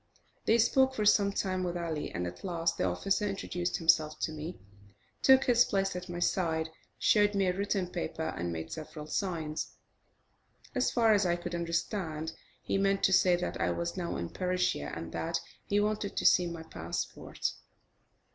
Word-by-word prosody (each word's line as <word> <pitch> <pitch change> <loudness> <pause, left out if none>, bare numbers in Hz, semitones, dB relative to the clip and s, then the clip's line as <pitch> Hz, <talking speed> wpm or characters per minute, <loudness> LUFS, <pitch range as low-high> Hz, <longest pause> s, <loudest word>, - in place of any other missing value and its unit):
They 225 - +5
spoke 265 +3 +3
for 215 - 0
some 205 -1 +5
time 185 -2 -1
with 175 -1 -2
Ali, 165 -3 -3
and 90 - -3
at 90 0 -7
last 170 -2 0
the - - 0
officer 195 - 0
introduced 180 -3 -2
himself 160 -2 +3
to - - 0
me, 155 +3 -6 0.6
took 265 0 +7
his 240 -1 +5
place 195 -3 0
at 180 0 -6
my 175 - -4
side, 160 -3 0 0.3
showed 205 -1 +4
me 195 -1 +3
a 180 - +2
written 200 -1 0
paper, 80 - -3
and 85 0 -3
made 80 -1 -5
several 155 -1 -7
signs. 160 -2 -3 1.0
As 255 -2 +2
far 225 -3 +4
as 205 -3 +3
I 175 - +2
could 175 0 -6
understand, 170 -1 -2 0.3
he 195 - 0
meant 195 0 +2
to 190 - +4
say 180 -1 +5
that 175 - -3
I - - +2
was 170 0 -2
now 175 -2 -3
in 85 0 -3
Persia, 180 - -1
and 80 0 -6
that 165 0 -1 0.3
he 205 - +2
wanted 210 -1 -1
to - - -1
see 180 -1 +6
my 170 -1 -6
passport. 85 - -4
180 Hz, 180 wpm, -31 LUFS, 160-200 Hz, 1.0 s, took